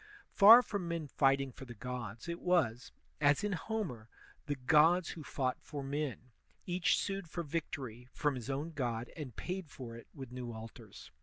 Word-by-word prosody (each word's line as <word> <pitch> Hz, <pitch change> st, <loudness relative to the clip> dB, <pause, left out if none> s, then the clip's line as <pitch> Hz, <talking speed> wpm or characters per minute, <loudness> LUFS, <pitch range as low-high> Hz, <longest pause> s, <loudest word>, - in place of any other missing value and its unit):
Far 225 Hz, +5 st, +10 dB
from 200 Hz, -5 st, -3 dB
men 170 Hz, -2 st, -2 dB
fighting 135 Hz, -1 st, +2 dB
for 135 Hz, -, -10 dB
the 120 Hz, -2 st, -9 dB
gods, 120 Hz, -1 st, -6 dB
it 170 Hz, 0 st, -3 dB
was, 135 Hz, -10 st, +1 dB, 0.3 s
as 145 Hz, +5 st, +4 dB
in 210 Hz, -, 0 dB
Homer, 175 Hz, -, -3 dB, 0.4 s
the 145 Hz, -, 0 dB
gods 160 Hz, +6 st, +4 dB
who 165 Hz, -, -6 dB
fought 130 Hz, -2 st, -1 dB
for 145 Hz, -2 st, -6 dB
men; 135 Hz, -3 st, -3 dB, 0.3 s
each 180 Hz, -1 st, +2 dB
sued 195 Hz, -4 st, -3 dB
for 170 Hz, +1 st, -3 dB
victory 135 Hz, -6 st, -4 dB
from 145 Hz, -2 st, 0 dB
his 125 Hz, -1 st, -6 dB
own 145 Hz, +5 st, -2 dB
god 120 Hz, -5 st, -3 dB
and 140 Hz, -8 st, -7 dB
paid 180 Hz, -3 st, -4 dB
for 120 Hz, -5 st, -8 dB
it 115 Hz, -, -11 dB
with 135 Hz, -5 st, -9 dB
new 125 Hz, -2 st, -5 dB
altars. 110 Hz, 0 st, -10 dB
140 Hz, 175 wpm, -34 LUFS, 125-170 Hz, 0.4 s, Far